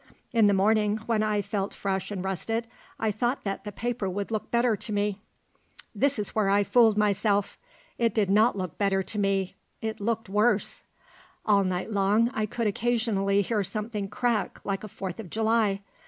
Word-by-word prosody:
In 225 -3 +5
the 205 - +4
morning, 210 +1 +3
when 225 -2 +1
I 210 -1 +1
felt 200 0 -3
fresh 190 -1 -2
and 195 -3 -4
rested, 225 +5 -2 0.3
I 220 -1 +1
thought 240 +5 -1
that 195 0 -4
the 205 - -4
paper 230 -2 -2
would 200 +3 -4
look 215 -2 -3
better 235 -1 +2
to 215 - -6
me. 205 -1 -1 0.7
There 280 - +3
is 210 -2 -2
where 210 -3 +1
I 200 +1 +4
fooled 225 -1 +4
myself. 205 -1 +1 0.4
It 230 -1 +1
did 210 -3 +2
not 215 +3 +4
look 185 -4 -5
better 195 -1 +2
to 210 - -4
me. 195 -2 0 0.3
It 220 -1 -4
looked 225 +1 -1
worse. 210 +2 +1 0.6
All 200 -2 +4
night 185 +3 -2
long 210 +4 +2
I 215 -1 -1
could 230 +3 -3
occasionally 210 -2 +1
hear 210 +1 0
something 210 0 -3
crack 215 -1 -1
like 200 0 -2
a - - -5
Fourth 190 -2 -6
of 205 -6 -7
July. 220 -2 +1
210 Hz, 185 wpm, -27 LUFS, 195-225 Hz, 0.7 s, In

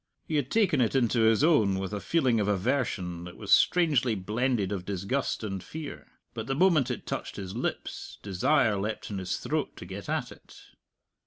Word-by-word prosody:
He 155 - -1
had 140 -3 -1
taken 190 - +3
it 120 +2 +1
into 120 -2 +2
his 110 +3 +4
own 110 - +4
with 95 +1 -4
a 105 - -2
feeling 130 -4 +2
of 105 - 0
aversion 100 -5 -1
that 90 - -10
was 100 -3 +1
strangely 145 -10 +4
blended 105 +1 0
of 95 -3 -3
disgust 100 +8 -2
and 95 -3 -4
fear. 155 -2 -8 0.3
But 110 -1 -5
the 135 - 0
moment 155 -5 +4
it 125 - -4
touched - - -4
his 95 0 -6
lips, 120 - -4
desire 105 +3 +2
leapt 105 +2 -4
in 100 - -3
his 95 -1 -2
throat - - -2
to - - -8
get - - -8
at - - -1
it. - - -15
110 Hz, 190 wpm, -28 LUFS, 100-135 Hz, 0.3 s, his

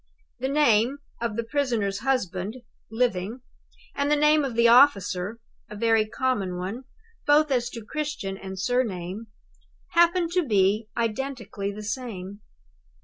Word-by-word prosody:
The 265 +2 -1
name 275 -3 +3 0.2
of 235 -3 -2
the 230 - -1
prisoner's 230 -6 -1
husband 210 -6 -1 0.3
(living) 225 0 -1 0.5
and 280 0 -1
the 300 - +4
name 300 0 +4
of 260 -4 -3
the 235 0 +5
officer 215 -5 +4 0.3
(a 210 - -8
very 225 0 +2
common 210 -7 -1
one, 200 +9 -5 0.4
both 295 0 +4
as 240 -2 +1
to 230 -3 -9
Christian 295 -9 -4
and 190 -1 -8
surname) 210 -3 -2 0.6
happened 345 0 +3
to 360 +1 +2
be 210 -3 +2
identically 230 -3 -3
the 210 +1 -8
same. 210 -4 -5
230 Hz, 135 wpm, -25 LUFS, 200-270 Hz, 0.6 s, the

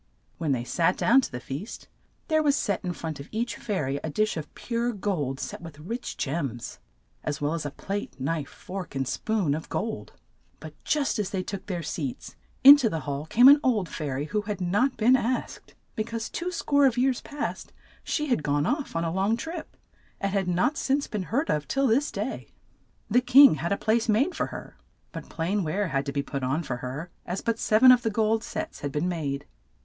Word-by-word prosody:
When 160 -4 0
they 125 -3 0
sat 170 +8 +1
down 270 +4 +5
to - - -5
the 125 - -5
feast 140 - -7 0.4
there 315 -1 +3
was 290 -2 +3
set 200 -9 -1
in 180 - -2
front 160 -4 -5
of 140 - -9
each 230 0 -2
fai 210 -5 -2
ry 135 +2 -2
a 160 - -2
dish 215 +8 0
of 155 -2 -6
pure 235 0 -2
gold, 160 -10 -2
set - - -5
with 165 -4 -10
rich 230 +11 -5
gems, 135 -5 -3 0.4
as 150 -1 -3
well 145 +2 0
as 165 -3 -2
a - - -3
plate, 195 -1 -5
knife, 145 +2 -2
fork, 185 -5 -8
and 135 -1 -1
spoon 190 +2 0
of 155 +2 -5
gold. 220 0 -4 0.5
But - - -9
just 285 -6 0
as 200 -2 -1
they 190 -2 -2
took 195 0 -6
their 175 -4 -3
seats, 145 -5 -5 0.3
in 280 +2 +12
to 250 -6 +1
the 160 -4 -3
hall 145 +1 -4
came 245 +9 +6
an 285 +2 +9
old 220 -9 +1
fai 155 -3 -4
ry 135 +2 -2
who 210 +8 -1
had 205 -2 -4
not 205 +9 +1
been 240 +4 +5
asked, 255 0 -3 0.2
be 215 - 0
cause 230 0 -5
two 355 +1 -3
score 285 -5 +3
of 250 -2 0
years 255 0 +2
past 295 0 -5 0.3
she 300 - -1
had 245 - +1
gone 145 0 +1
off 285 - -2
on 165 - 0
a 165 -1 -1
long 195 +5 +1
trip, 325 +5 -7 0.4
and 195 0 -2
had 195 -2 0
not 180 - +1
since 280 +1 +1
been 210 - -3
heard 280 +8 +1
of 150 -1 -1
till 275 0 +1
this 265 +5 +2
day. - - -4 0.6
The 245 +4 +5
king 260 +2 +8
had 170 - -2
a 200 - +2
place 225 +1 +1
made 265 - +3
for - - -1
her, - - -9 0.3
but - - -8
plain 185 +5 -1
ware 185 +4 -1
had 140 -1 -1
to - - -1
be 140 0 -1
put 140 -1 -4
on 135 +6 0
for 125 -5 -3
her, 135 +8 -6
as 180 +2 -4
but 230 0 -1
sev 215 +3 +2
en 255 - +11
of 250 -1 +5
the 225 - 0
gold 220 +1 +1
sets - - -5
had 145 - -4
been 150 +5 -1
made. 145 -5 -3
195 Hz, 225 wpm, -26 LUFS, 150-240 Hz, 0.6 s, in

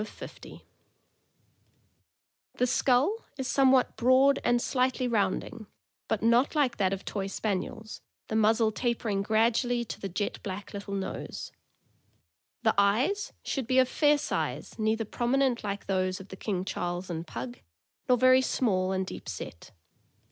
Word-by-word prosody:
5 215 - -4
Total - - -15
50 - - -11 1.9
The 250 - +2
skull 265 - +2 0.2
is 265 -2 -3
somewhat 265 -2 +3
broad 260 +4 +4
and 240 0 +3
slightly 255 0 0
rounding, 210 -1 -1 0.4
but 220 -1 -1
not 235 +6 +3
like 270 -5 +2
that 190 -2 +2
of 195 -1 -4
Toy 195 -2 -3
Spaniels, 210 +2 -4 0.3
the 220 - -3
muzzle 220 +1 +3
tapering 225 -3 -1
gradually 230 +3 +1
to - - -7
the 195 - -3
jet 190 +3 -3
black 200 0 -6
little 200 0 -5
nose. 195 -1 -5 1.1
The 220 - +4
eyes 250 - +2
should 265 -5 -3
be 255 - +2
of 260 -1 +6
fair 295 +2 +3
size, 285 - -3
neither 220 +1 +1
prominent 245 +2 0
like 200 -1 -4
those 185 -1 0
of 190 0 -12
the - - -8
King 190 -2 -3
Charles 175 -1 -3
and 165 0 -5
Pug, 120 -2 -6 0.5
nor 250 - +5
very 255 +1 +6
small 190 -8 +1
and 190 0 -1
deep - - -8
set. 85 - -7
220 Hz, 150 wpm, -28 LUFS, 195-255 Hz, 1.9 s, of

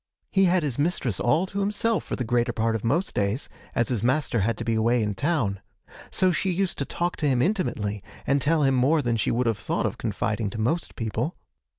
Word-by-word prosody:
He 195 -1 +4
had 180 -1 +3
his 140 -3 -2
mistress 145 - 0
all 155 +9 +2
to 195 +1 -4
himself 205 +3 +1
for - - -4
the 125 - -2
greater 120 +1 +1
part 115 0 0
of 110 - -3
most 165 +11 0
days, 100 +6 0 0.3
as 115 - +1
his 120 -5 0
master 125 0 +1
had 110 +2 0
to 115 - -4
be 115 - +1
away 115 +1 +2
in 105 -1 -1
town; 125 - 0 0.5
so 185 -1 +2
she 190 +3 0
used 185 0 -1
to 140 - 0
talk 175 +4 -2
to 150 - 0
him 130 -3 +2
intimately, 120 - 0 0.2
and 140 0 +2
tell 155 +2 +2
him 135 -1 +3
more 140 +5 +3
than 120 -1 +1
she 110 - 0
would 125 +2 +1
have 115 -3 0
thought - - -1
of - - -2
confiding 105 -1 -1
to 105 - -7
most 155 +10 -1
people. 115 +7 -2
125 Hz, 230 wpm, -25 LUFS, 115-170 Hz, 0.5 s, He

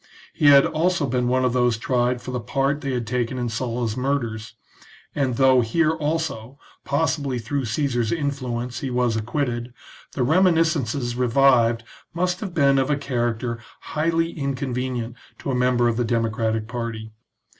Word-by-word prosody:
He 150 - +2
had 140 -1 +8
also 165 0 +1
been 125 -1 0
one 130 +1 +2
of 125 - +1
those 125 -2 +2
tried 125 +1 0
for 130 - -5
the 125 - -2
part 135 +4 -1
they 140 - -2
had 125 -2 -2
taken 125 +2 -2
in 120 -1 -2
Sulla's 115 -1 -2
murders, 120 -5 -2 0.6
and, 135 -4 0
though 130 0 +5
here 155 +8 +2
also, 150 -6 -3 0.3
possibly 140 -2 0
through 130 +4 -2
Caesar's 120 -2 0
influence, 125 -6 -3
he 135 - -3
was 125 -2 +1
acquitted, 120 +1 -2 0.4
the 130 - 0
reminiscences 155 -6 +2
revived 125 -2 +3 0.3
must 180 +1 0
have 190 -5 -6
been 140 -3 +4
of 135 - 0
a 145 - +2
character 120 -3 -2 0.3
highly 165 +2 +1
inconvenient 130 -4 -3 0.2
to 140 - -4
a - - 0
member 125 -1 +2
of 115 -1 0
the 120 - +1
democratic 110 -1 -1
party. 115 -2 -5
125 Hz, 155 wpm, -23 LUFS, 120-140 Hz, 0.6 s, had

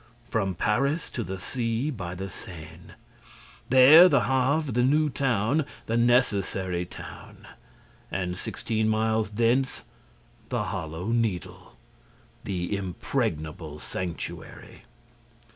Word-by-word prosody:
From 95 -4 -1
Paris 140 - 0
to 120 - -3
the 95 -1 -5
sea, 115 +7 -2
by 90 -8 -5
the 95 +2 -5
Seine. 85 -4 -11 0.8
There, 140 +8 +9
the 140 -6 +4
Havre, 135 +4 +1
the 120 - +2
new 150 +4 +3
town, 130 +3 +1 0.2
the 115 - -1
necessary 100 -7 +1
town. - - -11 0.7
And, 90 -2 -2
sixteen 110 +4 -2
miles 110 0 +1
thence, 120 +5 +1 0.7
the - - -1
Hollow 80 +5 -4
Needle, 110 - -2 0.7
the 90 0 -2
impregnable 80 -4 -3
sanctuary! 85 0 -6
110 Hz, 105 wpm, -27 LUFS, 90-130 Hz, 0.8 s, There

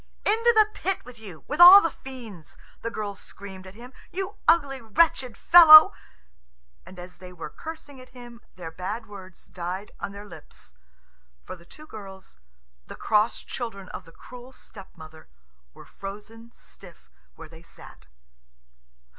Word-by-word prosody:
"Into 460 +3 +3
the 430 -1 +5
pit 385 -1 -4
with 245 -2 -14
you, 190 -8 -13
with 300 - -5
all 365 +3 +11
the 330 -5 -2
fiends," 230 - -13 0.2
the 230 - -4
girls 210 -3 -7
screamed 190 -2 -12
at 185 - -14
him, 245 +3 -14 0.2
"you 385 +3 -6
ugly, 285 -6 +1
wretched 245 +1 0
fellow!"... 315 -3 +8 0.9
And 185 - -14
as 180 0 -12
they 180 0 -13
were 165 -4 -10
cursing 315 -4 -11
at 255 - -17
him 240 -2 -14
their 170 -3 -9
bad 195 +7 -7
words 190 -4 -14
died 180 +2 -7
on - - -6
their 200 +1 -11
lips, 155 - -15 0.7
for - - -10
the 170 -1 -21
two 305 - -15
girls, 195 - -13 0.5
the - - -10
cross 215 +1 -1
children 200 -6 -8
of - - -10
the 165 - -17
cruel 250 +7 -14
stepmother, 160 -10 -15 0.5
were - - -15
frozen 210 +4 -12
stiff 180 -6 -18 0.2
where 160 - -13
they 160 +1 -16
sat. 165 - -16
210 Hz, 155 wpm, -24 LUFS, 185-265 Hz, 0.9 s, all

